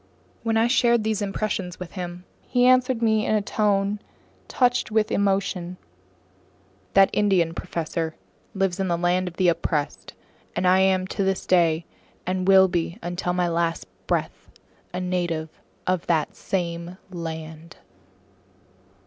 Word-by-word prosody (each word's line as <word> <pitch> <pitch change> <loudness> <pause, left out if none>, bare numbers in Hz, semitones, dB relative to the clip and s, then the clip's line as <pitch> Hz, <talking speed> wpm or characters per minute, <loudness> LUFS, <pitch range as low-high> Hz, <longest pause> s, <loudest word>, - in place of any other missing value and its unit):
When 225 -1 0
I 225 - +4
shared 235 -2 +3
these 215 -1 -1
impressions 195 -3 -3
with 180 -2 -7
him, 180 -1 -6 0.2
he 245 0 +1
answered 255 -1 +4
me 220 -1 +3
in 215 - +1
a 210 - +2
tone 205 -1 +1 0.5
touched 245 -2 +1
with 215 -1 +1
emotion: 195 -3 0 1.2
"That 195 0 +6
Indian, 190 -5 +2
professor, 165 -1 -3 0.4
lives 195 -1 0
in 190 - 0
the 170 -1 +1
land 180 +1 +1
of 175 - -6
the 185 - +3
oppressed, 165 -3 -1 0.4
and - - 0
I 185 +1 +5
am 190 -1 +3
to 200 - -1
this 190 0 -1
day, 170 -2 +3 0.4
and 185 0 -1
will 190 -1 +7
be 175 0 -2
until 175 0 -2
my 180 -1 +1
last 170 0 -1 0.2
breath, - - -2 0.4
a 180 - -3
native 175 -3 -2 0.4
of 185 -2 -1
that 160 -3 +1
same 175 -1 -3
land!" 160 -1 -7
185 Hz, 140 wpm, -24 LUFS, 170-205 Hz, 1.2 s, will